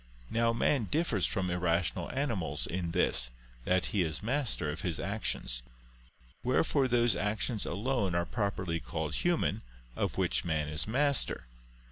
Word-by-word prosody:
Now 115 0 +2
man 120 +1 +1
differs 145 - +1
from 90 -2 -1
irrational 85 -1 0
animals 105 - -1
in 90 -1 -3
this, 85 -8 +3 0.4
that 90 -1 +2
he 100 - +3
is 80 +1 -2
master 120 - 0
of 85 +4 -6
his 85 -3 -2
actions. 100 - -2 0.8
Wherefore 135 +2 +2
those 120 -4 +3
actions 105 +4 -1
alone 100 -1 -1
are 85 0 +1
properly 95 -4 -2
called - - -4
human, - - 0 0.3
of - - -2
which - - +1
man 75 -3 -1
is 75 +4 -2
master. 140 - +4
95 Hz, 140 wpm, -31 LUFS, 85-120 Hz, 0.8 s, master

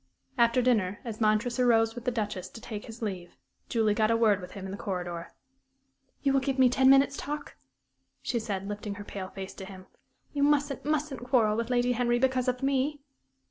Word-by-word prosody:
After 235 0 +3
dinner, 205 -6 +2
as 225 -1 -6
Montresor 235 +3 +2
rose 225 -1 +4
with 240 0 -9
the - - +3
Duchess 205 -5 -3
to - - -11
take 215 -2 -7
his 225 +1 -9
leave, 185 -4 -5 0.3
Julie 220 -3 +2
got 215 0 +2
a 230 - +3
word 215 -4 +3
with 180 0 -9
him 195 -1 -7
in 190 - -5
the - - -4
corridor. 175 -4 -4 0.9
"You 275 -1 +3
will 270 - +4
give 270 0 -2
me 260 -1 +6
ten 260 +1 +4
minutes' 275 +1 +5
talk?" 295 +1 -5 0.7
she 240 - -1
said, 195 -3 -4
lifting 205 0 -5
her 205 - -7
pale 190 -2 -6
face 190 0 -7
to 190 - -8
him. 190 -1 -11 0.5
"You 285 - -1
mustn't, 285 -1 +2
mustn't 300 -4 -1
quarrel 235 -5 +3
with 230 +1 -2
Lady 245 0 +2
Henry 240 0 +1
because 260 0 +1
of 250 +1 -1
me." 275 +2 +1
230 Hz, 205 wpm, -29 LUFS, 205-260 Hz, 0.9 s, me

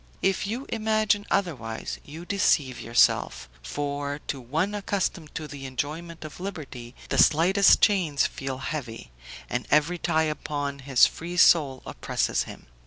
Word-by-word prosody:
If 195 +1 +1
you 240 +6 -4
imagine 215 -2 +1
otherwise, 135 - -2
you 160 +4 -10
deceive 150 -10 +1
yourself; 115 - +2
for, 145 0 -3
to 135 - -3
one 160 - -1
accustomed 195 -6 -3
to 155 - -4
the 135 -1 -8
enjoyment 155 +5 -5
of 155 - -10
liberty, 140 -10 -7
the - - +1
slightest 185 +6 +5
chains 175 -9 +3
feel 135 -1 -4
heavy, 125 - -6 0.4
and - - -3
every 155 +4 +2
tie 160 -2 +1
upon 145 -2 -3
his 135 -2 +5
free 175 +2 -5
soul 145 -7 +5
oppresses - - -1
him. - - -11
155 Hz, 140 wpm, -26 LUFS, 135-185 Hz, 0.4 s, slightest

